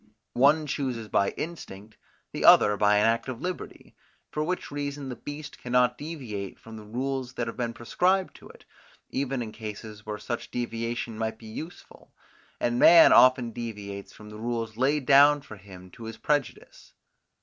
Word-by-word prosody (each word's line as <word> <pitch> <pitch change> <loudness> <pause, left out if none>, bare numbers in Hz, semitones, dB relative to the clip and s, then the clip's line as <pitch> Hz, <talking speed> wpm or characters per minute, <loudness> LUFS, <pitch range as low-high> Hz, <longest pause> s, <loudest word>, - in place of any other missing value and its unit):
One 150 +4 +4
chooses 130 -6 -3
by 100 0 +2
instinct; 110 - -7 0.4
the - - -4
other 105 - +7
by 105 0 +3
an 105 - +3
act 115 +3 +1
of 125 -2 -5
liberty; 180 +4 -7 0.4
for 150 - -2
which 180 0 -3
reason 145 -1 -4
the 125 - -5
beast 145 +3 -9
cannot 125 0 +2
deviate 125 - -6
from 115 -1 -12
the 110 - -9
rules 130 +3 -4
that 120 - -2
have 115 - -6
been 120 -2 -2
prescribed 185 +10 0
to - - -15
it, - - -17 0.5
even 135 -2 -2
in 110 - -7
cases 110 -1 -8
where 105 -1 -5
such 120 +3 -5
deviation 115 -1 -4
might 110 0 -2
be 115 - -15
useful, 155 +10 -10 0.5
and 120 0 0
man 170 -1 +8
often 130 -2 +5
deviates 105 -4 -7
from 105 0 -13
the 105 - -10
rules 115 -1 -3
laid 135 +3 +1
down 145 +1 +6
for 110 - -11
him 95 -2 -13
to 115 - -11
his 110 0 -7
prejudice. 145 +4 -3
120 Hz, 170 wpm, -27 LUFS, 110-140 Hz, 0.5 s, man